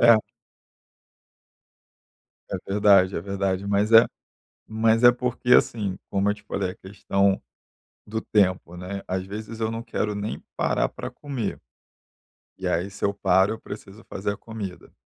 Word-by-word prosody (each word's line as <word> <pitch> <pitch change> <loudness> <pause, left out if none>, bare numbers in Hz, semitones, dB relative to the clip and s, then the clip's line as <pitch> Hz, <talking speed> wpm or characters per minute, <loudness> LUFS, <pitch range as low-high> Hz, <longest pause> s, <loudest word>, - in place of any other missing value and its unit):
É. 115 -1 +8 2.3
É - - -1
verdade, 100 -2 +4
é - - -1
verdade, 100 0 -2
mas 100 +2 +1
é 115 0 +9 0.7
mas 110 +1 +3
é 120 - +9
porque, 125 0 -1
assim, 100 -5 +3
como 100 +1 +1
eu - - 0
te 105 - -18
falei, 100 -2 -2
a - - -9
questão 100 0 0 0.6
do 110 +1 -3
tempo, 95 -5 +1
né, 95 +2 -6
às 95 0 -2
vezes 110 +3 -7
eu 110 0 0
não 115 0 -4
quero 105 -3 -2
nem 105 +2 -4
parar - - +1
pra - - -7
comer. 135 -8 -4 1.0
E - - -5
aí 90 +4 0
se 100 - -6
eu 100 - +2
paro 95 0 +3
eu 110 - -11
preciso 100 +1 -10
fazer 100 +1 -2
a - - -7
comida. 105 -5 -8
100 Hz, 155 wpm, -25 LUFS, 95-110 Hz, 2.3 s, é